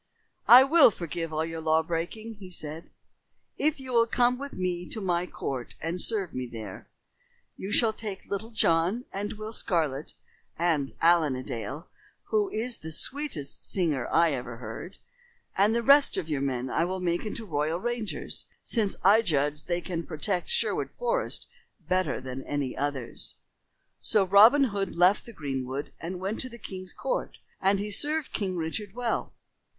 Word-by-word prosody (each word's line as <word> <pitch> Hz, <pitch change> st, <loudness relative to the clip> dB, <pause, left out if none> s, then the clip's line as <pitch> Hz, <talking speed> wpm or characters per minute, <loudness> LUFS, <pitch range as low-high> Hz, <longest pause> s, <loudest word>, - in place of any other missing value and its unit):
"I 250 Hz, +2 st, +11 dB
will 295 Hz, +1 st, +7 dB
forgive 170 Hz, -4 st, -4 dB
all 155 Hz, +1 st, -1 dB
your 165 Hz, 0 st, -5 dB
law 160 Hz, 0 st, +3 dB
breaking," 175 Hz, +7 st, -4 dB
he 190 Hz, -2 st, -9 dB
said, 160 Hz, -2 st, -5 dB, 0.7 s
"if 305 Hz, 0 st, +1 dB
you 260 Hz, -1 st, -6 dB
will 230 Hz, -1 st, +5 dB
come 245 Hz, +1 st, +2 dB
with 280 Hz, 0 st, -6 dB
me 180 Hz, -1 st, -3 dB
to 220 Hz, -, -1 dB
my 180 Hz, -3 st, 0 dB
court 130 Hz, -8 st, -5 dB
and 170 Hz, +2 st, -1 dB
serve 200 Hz, -7 st, +2 dB
me 125 Hz, 0 st, -3 dB
there. 110 Hz, -5 st, -9 dB, 0.7 s
You 195 Hz, -, -6 dB
shall 220 Hz, 0 st, +5 dB
take 210 Hz, -3 st, -6 dB
Little 200 Hz, +3 st, -4 dB
John 190 Hz, +1 st, +2 dB
and 205 Hz, +2 st, -3 dB
Will 215 Hz, +1 st, -6 dB
Scarlet 155 Hz, -8 st, -1 dB, 0.4 s
and 160 Hz, -5 st, +1 dB
Allen 165 Hz, -5 st, +4 dB
a 130 Hz, -, -5 dB
Dale, 135 Hz, +8 st, -5 dB, 0.4 s
who 420 Hz, -2 st, +2 dB
is 235 Hz, -4 st, -1 dB
the 160 Hz, -, -7 dB
sweetest 220 Hz, -, -2 dB
singer 155 Hz, -10 st, +1 dB
I 170 Hz, -1 st, +4 dB
ever 125 Hz, -3 st, -5 dB
heard; 115 Hz, -, -8 dB, 0.6 s
and 205 Hz, +4 st, +3 dB
the 235 Hz, -, 0 dB
rest 280 Hz, -1 st, +6 dB
of 180 Hz, -4 st, -2 dB
your 145 Hz, -4 st, -1 dB
men 130 Hz, -2 st, -1 dB
I -, -, +2 dB
will 185 Hz, +2 st, -2 dB
make 175 Hz, -1 st, 0 dB
into 220 Hz, +1 st, -5 dB
royal 155 Hz, -1 st, -1 dB
rangers, 235 Hz, -1 st, -3 dB, 0.2 s
since 215 Hz, -5 st, 0 dB
I 205 Hz, +4 st, +6 dB
judge 150 Hz, -6 st, +1 dB
that -, -, -20 dB
they 175 Hz, 0 st, 0 dB
can 170 Hz, -3 st, -4 dB
protect 175 Hz, +3 st, -1 dB
Sherwood 475 Hz, -, +1 dB
Forest -, -, -1 dB, 0.3 s
better 185 Hz, 0 st, 0 dB
than 130 Hz, 0 st, -6 dB
any 145 Hz, -3 st, -2 dB
others." 140 Hz, -3 st, -4 dB, 0.7 s
So 210 Hz, -3 st, +3 dB
Robin 215 Hz, +9 st, +7 dB
Hood 195 Hz, -1 st, -2 dB
left 180 Hz, +6 st, +4 dB
the -, -, -8 dB
greenwood 135 Hz, -, -4 dB
and 180 Hz, +2 st, -5 dB
went 195 Hz, +4 st, -3 dB
to 255 Hz, -, -3 dB
the 235 Hz, -, -10 dB
king's 185 Hz, -4 st, -8 dB
court -, -, -3 dB, 0.2 s
and 195 Hz, +1 st, +3 dB
he 205 Hz, +1 st, -3 dB
served 300 Hz, +7 st, +1 dB
King 190 Hz, -3 st, -2 dB
Richard 190 Hz, +6 st, -4 dB
well. 245 Hz, -2 st, -2 dB
180 Hz, 170 wpm, -28 LUFS, 155-220 Hz, 0.7 s, I